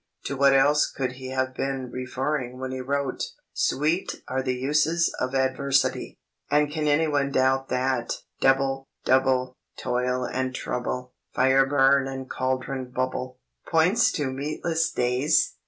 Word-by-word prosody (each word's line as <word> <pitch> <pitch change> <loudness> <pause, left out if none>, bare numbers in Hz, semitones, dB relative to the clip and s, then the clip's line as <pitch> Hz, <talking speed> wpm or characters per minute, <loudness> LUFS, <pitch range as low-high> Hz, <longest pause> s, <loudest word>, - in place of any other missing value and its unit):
To 140 - -2
what 140 0 +5
else 145 +2 +4
could 130 -2 -2
he 130 0 -8
have 130 0 -1
been 135 -1 -3
referring 130 0 -3
when 130 0 -5
he 130 0 -4
wrote 140 0 -2 0.3
"Sweet 155 +6 0
are 130 +1 -1
the 130 -1 -1
uses 150 +6 +1
of 130 +1 -2
adversity," 130 0 0 0.3
and 150 0 +2
can 155 0 -1
anyone 145 -2 +2
doubt 135 0 +2
that 130 -1 0 0.3
"Double, 135 0 +2 0.2
double, 130 -1 +2 0.2
toil 125 +1 -1
and 130 0 -2
trouble, 125 0 -4 0.2
Fire 130 +1 +4
burn 135 0 +4
and 135 -1 -6
cauldron 130 0 -2
bubble," 130 0 -3 0.3
points 180 +8 +3
to 140 -4 -1
meatless 155 +4 -1
days? 125 +5 +2
130 Hz, 140 wpm, -25 LUFS, 130-140 Hz, 0.3 s, what